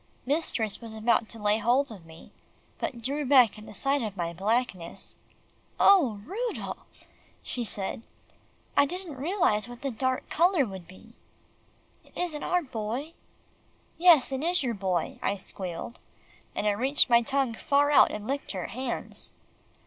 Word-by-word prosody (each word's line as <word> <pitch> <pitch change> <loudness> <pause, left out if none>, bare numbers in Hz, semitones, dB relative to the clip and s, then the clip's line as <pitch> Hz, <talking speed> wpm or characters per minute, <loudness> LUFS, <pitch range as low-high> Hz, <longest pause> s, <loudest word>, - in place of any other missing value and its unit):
Mistress 250 -8 -1
was 225 -1 -7
about 225 0 +2
to 230 - -7
lay 210 0 +1
hold 245 +5 +2
of 185 -6 -11
me, 160 0 -14 0.5
but 235 -2 -4
drew 285 +5 -1
back 255 -5 +5
at 215 - -12
the - - -11
sight 275 +5 +1
of 210 -3 -4
my 170 -1 -2
blackness. 195 -1 -2 0.6
"Oh! 290 - +5
Rudolph," 460 - -5 0.4
she 245 - -3
said, 205 -1 -3 0.7
"I 285 - +5
didn't 360 -1 -6
realise 270 - +1
what 245 +2 -11
the 275 - -1
dark 260 +2 -1
colour 345 -3 +3
would 190 -5 -8
be. 185 - -16 0.9
It - - -23
isn't 320 -4 -2
our 360 -1 +1
Boy." 250 +5 -4 0.9
"Yes, 330 -7 +6
it 265 0 -2
is 345 -2 +2
your 240 -2 0
Boy," 185 -4 -2
I 200 - 0
squealed, 185 +1 -6 0.6
and - - -2
I 210 - +4
reached 260 +8 +4
my 235 -1 +5
tongue 270 0 0
far 285 +5 +2
out 290 - +7
and 210 0 -6
licked 275 0 -3
her 185 -3 -4
hands. 255 0 -5
245 Hz, 155 wpm, -28 LUFS, 210-285 Hz, 0.9 s, out